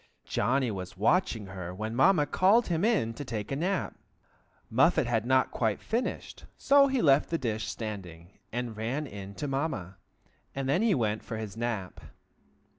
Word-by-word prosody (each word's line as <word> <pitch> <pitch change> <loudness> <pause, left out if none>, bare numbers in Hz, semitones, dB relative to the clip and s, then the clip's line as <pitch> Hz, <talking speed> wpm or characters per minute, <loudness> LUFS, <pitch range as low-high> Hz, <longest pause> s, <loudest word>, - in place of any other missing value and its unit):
Johnny 130 -2 +1
was 95 -2 -7
watching 110 - +1
her 90 -2 -7
when 110 +3 -4
Mamma 150 +3 +4
called 200 +9 +3
him 170 +1 0
in 205 - +2
to 145 - -6
take 110 -4 -5
his 135 - -1
nap. 185 +3 -1 0.7
Muffet 135 +5 +3
had 115 -1 0
not 130 0 +3
quite 110 -4 0
finished, 235 +3 -3
so 280 0 +5
he 265 -2 0
left 140 -1 +4
the 165 - 0
dish 110 -5 -2
standing, 95 -6 -7
and 120 -1 -3
ran 120 +8 -2
in 100 -4 -9
to 145 - -4
Mamma, 135 - -3 0.6
and 135 -1 -2
then 140 +8 +2
he 225 -3 +3
went 110 -4 0
for 115 - -5
his 110 -2 -6
nap. 115 -5 -4
120 Hz, 170 wpm, -29 LUFS, 105-155 Hz, 0.7 s, so